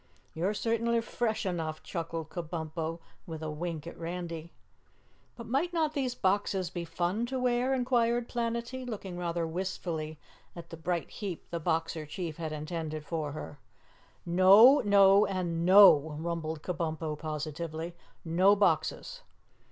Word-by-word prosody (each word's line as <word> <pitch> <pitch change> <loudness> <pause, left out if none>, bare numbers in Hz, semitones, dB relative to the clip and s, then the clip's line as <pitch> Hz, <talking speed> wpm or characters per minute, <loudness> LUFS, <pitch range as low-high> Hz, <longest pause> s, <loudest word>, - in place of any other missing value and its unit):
"You're 185 +6 -1
certainly 230 +1 +1
fresh 230 -1 -2
enough," 160 -4 -3
chuckled 165 -2 -4
Kabumpo 165 -1 -4 0.3
with 160 -1 -6
a 155 - -3
wink 160 0 -4
at 170 - -8
Randy. 170 -1 -5 0.8
"But 235 - -9
might 280 +10 0
not 315 -3 +1
these 260 -3 -1
boxes 190 -3 0
be 175 -1 -4
fun 175 +7 -1
to 260 +1 -3
wear?" 250 +1 +1
inquired 240 -2 +1
Planetty, 235 +2 -3
looking 205 -7 -6
rather 170 -1 -2
wistfully 165 -2 -4 0.4
at 170 -1 -10
the - - -6
bright 170 +1 -2
heap 195 -6 -6
the 170 - -2
Boxer 165 -1 -1
Chief 160 0 -5
had 160 -2 -4
intended 155 0 -4
for 155 -2 -3
her. 145 -1 -8 0.7
"No, 195 +10 +7
No 200 0 +6
and 175 -3 -2
NO!" 170 -6 +7
rumbled 160 -2 -3
Kabumpo 160 -3 -3
positively. 155 +2 -4 0.3
"No 185 +5 +4
boxes!" - - 0
175 Hz, 135 wpm, -30 LUFS, 160-215 Hz, 0.8 s, No